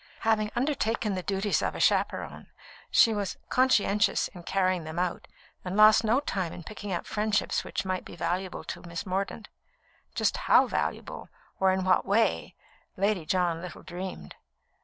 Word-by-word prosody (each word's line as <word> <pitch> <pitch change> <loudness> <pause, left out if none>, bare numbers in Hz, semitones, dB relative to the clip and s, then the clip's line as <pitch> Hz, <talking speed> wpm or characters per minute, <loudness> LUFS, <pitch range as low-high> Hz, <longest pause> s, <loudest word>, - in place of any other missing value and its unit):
Having 215 -1 +2
undertaken 235 -5 0
the 185 - -2
duties 195 +2 0
of - - -2
a - - -5
chaperon, - - 0 0.4
she 225 - +5
was 205 -2 -3
conscientious 225 -5 +2
in 180 - -11
carrying 185 -1 0
them 160 +1 -7
out, 180 -1 -2 0.4
and 185 +2 -4
lost 215 +1 +7
no 225 +4 +3
time 190 - -3
in 175 - -9
picking 205 +2 -7
up 175 - -1
old - - -25
friendships 215 0 0
which - - -4
might 185 -1 -2
be - - -11
valuable 175 +2 -3
to - - -7
Miss 170 +1 -6
Mordaunt 195 +3 -3 0.7
just - - +1
how - - +5
valuable, - - -3 0.3
or 190 0 +4
in 190 0 0
what 185 - +3
way, 200 - +1 0.4
Lady 195 -4 0
John 175 -2 +1
little 180 -2 -9
dreamed. 180 - -7
190 Hz, 165 wpm, -28 LUFS, 180-215 Hz, 0.7 s, lost